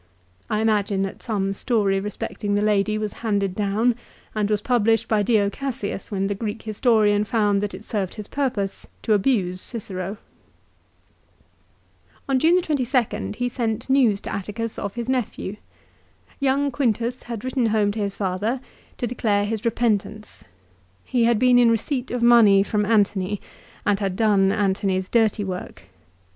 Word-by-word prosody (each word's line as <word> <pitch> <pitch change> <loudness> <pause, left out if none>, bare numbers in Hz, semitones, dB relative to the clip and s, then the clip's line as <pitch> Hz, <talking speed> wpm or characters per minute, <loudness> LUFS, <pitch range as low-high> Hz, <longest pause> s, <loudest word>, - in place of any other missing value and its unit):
I 215 - 0
imagine 205 -3 +1
that 195 - -5
some 195 -4 -1
story 200 -3 +1
respecting 205 +1 -3
the 205 - +1
lady 210 0 +2
was 215 -2 -3
handed 200 -4 0
down, 210 +5 +1 0.4
and 210 -1 0
was 210 -1 +2
published 225 -1 +2
by 215 -2 +2
Dio 205 -1 +3
Cassius 240 -8 -4
when 195 -1 -1
the 200 - 0
Greek 210 +1 -5
historian 215 -2 +2
found 205 -2 +1
that 205 -2 -3
it 195 +3 -11
served 195 -4 -3
his 210 -2 -7
purpose 235 -9 -2 0.2
to 220 - +2
abuse 190 -4 +1
Cicero. 195 -3 -5 2.1
On 270 -1 +2
June 335 +5 +4
22nd 250 -8 -1
he 245 +2 -1
sent 235 0 -2
news 245 -7 +4
to - - -6
Atticus 215 +3 -4
of 200 -1 -4
his 235 -1 -4
nephew. 245 -5 -2 0.8
Young 280 +1 +1
Quintus 240 -1 -1
had 230 -3 -5
written 255 -2 +1
home 210 -2 +2
to 215 - -5
his 200 -1 -1
father 205 +6 -1 0.4
to - - -2
declare 215 -4 0
his 220 0 -3
repentance. 215 -2 -1 0.6
He 240 -2 +2
had 235 -1 +3
been 250 +2 +5
in 240 -1 +5
receipt 245 +3 -1
of 245 -1 -2
money 220 -5 +6
from 210 0 -1
Antony, 205 -2 +1 0.5
and 205 -1 +2
had 195 -3 -1
done 200 -3 +3
Antony's 190 -2 0
dirty 220 -3 +2
work. 185 -2 -6
215 Hz, 155 wpm, -23 LUFS, 200-235 Hz, 2.1 s, money